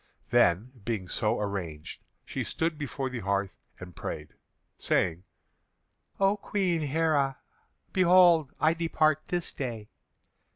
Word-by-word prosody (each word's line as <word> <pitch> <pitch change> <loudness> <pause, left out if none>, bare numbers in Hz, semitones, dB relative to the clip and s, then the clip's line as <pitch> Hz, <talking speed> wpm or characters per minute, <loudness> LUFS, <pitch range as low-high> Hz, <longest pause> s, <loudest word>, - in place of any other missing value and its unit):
Then, 95 +9 +3
being 105 -4 -3
so 110 +4 0
arranged, 90 -7 -5 0.2
she - - -3
stood 165 0 -1
before 140 -2 -4
the 130 -2 -4
hearth 100 -1 -1 0.2
and 90 -1 -10
prayed, - - -6 0.5
saying: 85 +2 0 0.9
"O 195 +1 +3
Queen 185 -5 0
Heré, 145 -2 +1 0.6
behold! 175 -5 +5
I 155 +1 +4
depart 155 -2 +1
this 175 -1 -2
day. 115 -6 -5
135 Hz, 115 wpm, -28 LUFS, 100-165 Hz, 0.9 s, behold